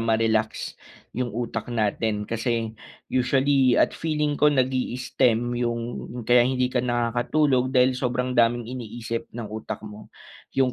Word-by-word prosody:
ma-relax 110 -1 0 0.3
'yung 125 0 -2
utak 115 0 -4
natin, 110 -2 0
kasi 115 0 -2 0.4
usually 130 0 +3
at - - +3
feeling 150 -2 -1
ko 150 - +6
nag-i-stem 125 -3 +1
'yung 120 -1 0 0.4
kaya 120 +1 +5
hindi 125 -1 0
ka 125 - +2
nakakatulog 125 +3 +1
dahil 130 0 +4
sobrang 125 0 -1
daming 120 -1 +3
iniisip 115 -1 -5
ng 120 0 -7
utak 110 0 -6
mo. 105 0 -10 0.5
'Yung 130 -2 +3
120 Hz, 130 wpm, -25 LUFS, 115-130 Hz, 0.5 s, ko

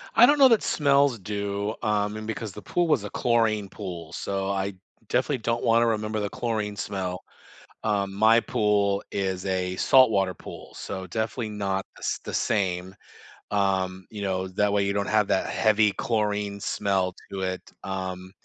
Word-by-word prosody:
I - - +9
don't 290 0 +4
know 270 - +9
that 230 - +4
smells 140 -4 +3
do, 100 +1 -3
um, 105 -1 0
and 110 - -6
because 110 -1 -4
the 105 - -10
pool 175 -1 0
was 145 -9 +2
a 105 - -5
chlorine 110 -4 +1
pool, 90 -6 -7
so 95 +1 -2
I 100 0 -1 0.3
definitely 130 +5 +1
don't 115 +1 -1
wanna 115 +1 +4
remember 110 -1 -1
the 105 -1 -2
chlorine 110 -3 -2
smell. 95 -3 -4 0.6
Um, 100 -3 0
my 110 +3 +5
pool 105 -4 +1
is 95 -2 -2
a 90 -1 -1
saltwater 105 -8 +4
pool, - - -11
so 95 -1 -6
definitely 110 +4 -2
not 100 -2 -2
the - - -15
s - - -1
the - - -6
same, 95 -3 0 0.6
um, 95 -2 0
you 105 -2 -7
know, 95 -1 -1
that 100 +2 +1
way, 100 -1 +3
you 100 - 0
don't 100 0 -1
have 105 -2 +3
that - - +1
heavy 110 -1 +3
chlorine 105 -3 -1
smell 95 -2 0 0.2
to 95 -1 -4
it, 95 -1 -2 0.2
um, 95 -1 -5
100 Hz, 170 wpm, -26 LUFS, 95-110 Hz, 0.6 s, I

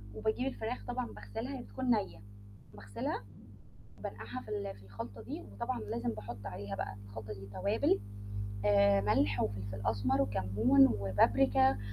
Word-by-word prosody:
وباجيب 220 - 0
الفراخ 245 -2 -3
طبعًا 245 0 -1
باغسلها 260 +5 -5
هي 245 - -7
بتكون 260 0 -5
نية، 200 - +2 0.5
باغسلها 105 0 -4 0.8
وبانقعها 110 +5 -6
في - - -12
ال 100 -1 -3
في 100 - -16
الخلطة 100 +2 -7
دي، 110 - -6
وطبعا 100 - -2
لازم 115 +2 -2
باحط 110 0 -5
عليها 100 -3 -4
بقى 95 0 -4
الخلطة 105 0 -6
دي 100 -1 -9
توابل، 95 +1 +2 0.7
آآ 100 -1 +6
ملح 100 0 +3
وفلفل 100 -1 -3
أسمر 105 -4 +3
وكمون 100 +8 +5
وبابريكا 125 - +4
105 Hz, 140 wpm, -34 LUFS, 100-125 Hz, 0.8 s, آآ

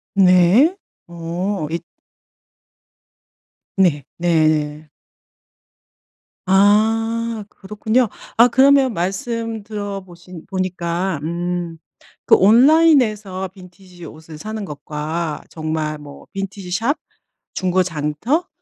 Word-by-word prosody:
네. 190 - +5 0.3
어 170 +1 -3
이 170 - -1 2.0
네. 170 -7 +2
네. 155 -3 +1 1.6
아. 205 +4 +4 0.5
그렇군요. 220 +5 -1 0.3
아 235 - +8
그러면 265 0 +4
말씀 225 +4 -3
들어 205 -2 -5
보신 175 -2 -13
보니까 185 -2 -2
음 175 0 -3 0.5
그 - - +6
온라인에서 220 - +4
빈티지 180 -1 -15
옷을 155 0 -11
사는 215 +5 -6
것과 150 +1 -4
정말 155 -1 -3
뭐 145 -1 -13
빈티지 195 -2 -6
숍, 230 - 0 0.6
중고 185 0 +1
장터 175 - -2
185 Hz, 160 characters per minute, -19 LUFS, 165-215 Hz, 2.0 s, 아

